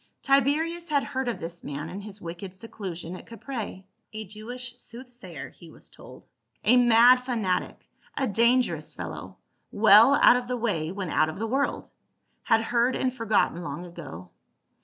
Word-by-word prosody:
Tiberius 310 +5 +1
had 285 -2 +2
heard 265 -2 -3
of 240 - -2
this 170 +1 -7
man 145 +2 -5
in 185 +4 -7
his 205 0 -10
wicked 175 +2 -8
seclu 195 -4 -7
sion 170 +1 -7
at - - -12
Caprae, 230 -5 -6
— - - -49
a 215 0 -6
Jewish 240 +5 -8
soothsayer, 240 - -10
he 170 - -15
was - - -12
told, - - -14 0.4
a 240 - +5
mad 245 0 +7
fanatic, 235 -7 -2 0.3
a 270 - +1
dangerous 235 +3 +1
fellow, - - -7 0.3
well 280 - +7
out 250 - +6
of 245 -1 -5
the 250 0 -2
way 185 -9 -1
when 190 -3 -5
out 155 - +2
of 160 - -7
the 220 - -2
world 270 +5 -1 0.3
— - - -47
had 225 -1 +3
heard 240 +2 +1
and 255 -1 -1
forgotten 220 -7 +1
long 175 0 -6
ago. 140 - -10
225 Hz, 175 wpm, -26 LUFS, 180-250 Hz, 0.4 s, mad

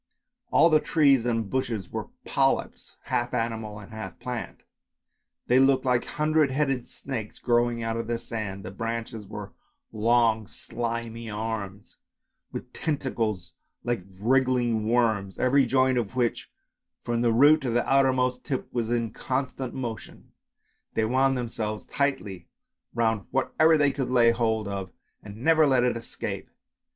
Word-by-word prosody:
All 165 - +5
the 155 - +6
trees 140 -7 +3
and 115 -3 0
bushes 110 -5 -2
were - - -4 0.2
polyps, - - 0
half 120 +1 -1
animal 115 -3 -2
and 105 -1 -11
half 110 -4 -7
plant; 125 -2 -6 0.8
they 125 +1 +4
looked 135 0 +4
like 125 -2 +2
hundred 155 -1 +2
headed 135 -2 0
snakes 115 -6 -6
growing 120 -1 +1
out 115 0 -1
of 115 -1 -3
the 120 0 -1
sand, 110 -4 -5
the - - -6
branches 115 0 -4
were 105 -1 -8 0.4
long 115 -1 +2
slimy 115 -1 -5
arms, 105 -2 -5 0.5
with - - -7
tentacles 115 - -2 0.3
like 120 -5 -1 0.2
wriggling 120 -2 +2
worms, 110 -5 +1
every 130 +1 +3
joint 130 0 +3
of 115 +1 -4
which 120 -2 -1 0.5
from 120 -1 -1
the 120 -1 +3
root 145 +7 +6
to 130 - -2
the 120 +1 +1
outermost 130 -2 +2
tip 130 - -4
was 115 -2 -1
in 115 -2 0
constant 130 +1 -3
motion. 120 -4 -6 0.6
They 110 - +2
wound 130 +3 +2
themselves 110 -3 -3
tightly 135 -11 -2 0.5
round 110 -4 +1
whatever 155 +4 +3
they 145 -2 +3
could 135 -2 -3
lay 120 -2 +5
hold 110 -2 0
of 95 -3 -4 0.3
and 105 +3 -10
never 160 -1 +5
let 130 -3 +4
it 125 -1 +2
escape. 115 - -5
120 Hz, 145 wpm, -26 LUFS, 110-130 Hz, 0.8 s, the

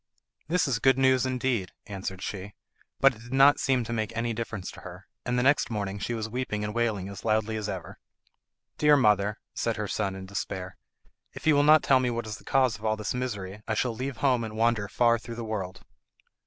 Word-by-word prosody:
"That 175 0 +2
is 125 -4 0
good 135 +1 +4
news 130 -1 +3
indeed," 125 -7 -1
answered 95 -2 -6
she; 100 0 -6 0.4
but 135 0 +6
it 110 - -15
did 120 +2 -9
not 135 +2 +6
seem 130 -2 +2
to 115 +1 -5
make 110 -1 -2
any 115 0 0
difference 110 -4 -5
to - - -12
her, 90 +2 -10 0.2
and 125 0 0
the 125 - +2
next 140 +3 +3
morning 100 -3 -3
she 120 +4 -2
was 110 -1 -3
weeping 110 -3 -3
and 105 0 -3
wailing 110 -5 0
as 100 -1 -9
loudly 110 0 +1
as 105 -1 -3
ever. 95 -4 -6 0.8
"Dear 150 -1 +6
mother," 105 -4 +3 0.2
said 115 -1 -1
her 105 -1 -2
son 100 -1 -2
in 95 0 -7
despair, 95 -1 -5 0.6
"if - - -10
you 160 - +5
will 145 - +4
not 155 +1 +6
tell 135 -1 +5
me 125 -1 +1
what 115 -1 -3
is 105 -1 -5
the - - -17
cause 130 -5 +2
of - - -16
all 110 0 +1
this 105 -1 -3
misery 105 -6 -4
I 110 - 0
shall 120 +1 0
leave 130 +2 -4
home 125 -3 +2
and 110 -1 -6
wander 115 -2 +2
far 115 +2 +3
through 115 +1 -8
the 115 -1 -5
world." 100 -4 -5
115 Hz, 225 wpm, -27 LUFS, 105-125 Hz, 0.8 s, but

